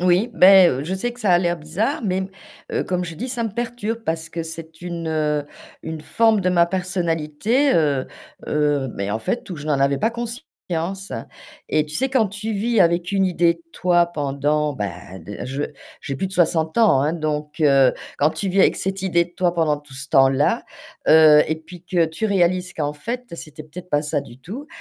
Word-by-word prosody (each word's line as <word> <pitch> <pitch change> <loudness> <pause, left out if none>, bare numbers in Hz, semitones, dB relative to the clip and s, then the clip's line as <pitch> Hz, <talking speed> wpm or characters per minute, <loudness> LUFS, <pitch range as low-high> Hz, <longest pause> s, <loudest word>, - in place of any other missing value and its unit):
Oui, 180 +6 +2
bah, 190 -2 +8
heu, 130 -3 -1
je 185 - -2
sais 240 +6 -2
que 245 - -14
ça 205 -5 +2
a 175 - +6
l'air 175 -1 0
bizarre, 180 - -2
mais, 190 -3 0 0.5
heu, - - 0
comme 180 -1 -2
je 165 -1 -7
dis, 245 +10 -5
ça 240 -2 -2
me 225 - -2
perturbe 230 0 -3
parce 160 0 -3
que 165 +1 -4
c'est 160 0 -9
une, 170 -1 -5
heu, 150 -2 0 0.4
une 160 -1 -5
forme 225 +6 +2
de 185 - +1
ma 175 -2 +4
personnalité, 180 - 0
heu 145 -5 +2 0.4
heu, 145 -3 +1
mais 100 0 -3
en 110 - -1
fait, 240 - -3
où 180 - -4
je 150 0 -8
n'en 150 -3 +1
avais 140 0 +2
pas 225 - +1
conscience 200 - -5 0.6
et 155 - +2
tu 150 0 -8
sais, 265 +8 +1
quand 255 -6 +2
tu 210 +3 -5
vis 225 +2 +1
avec 170 +1 +2
une 195 -1 +2
idée 175 -2 +2
de 170 - -22
toi 175 -1 +3
pendant, 150 -1 -1
bah 95 -5 -6
de 100 +7 -8
je 135 +3 -3 0.4
j'ai 140 - -5
plus 190 - -2
de - - -12
60 165 -1 +1
ans, 215 -13 +5
hein, 150 +3 +1
donc 155 -1 -3
heu, 135 -4 +5 0.2
quand 150 +2 +3
tu 195 - -3
vis 190 +1 +2
avec - - +4
cette 190 0 -3
idée 175 -3 +2
de 175 - -23
toi 180 -2 +1
pendant 160 -3 +1
tout 145 -1 -16
ce 135 +1 -7
temps-là, 135 +1 +3 0.4
heu 155 -1 +8
et 160 - -1
puis 170 +2 -13
que 175 -2 +2
tu 160 +7 -5
réalises 185 -3 +1
qu'en 150 -3 -3
fait 240 +11 -5
c'était 155 -2 -9
peut-être 180 +4 -11
pas 145 - +2
ça 150 -2 -2
du 120 - -14
tout, 240 - -8
170 Hz, 215 wpm, -21 LUFS, 150-195 Hz, 0.6 s, bah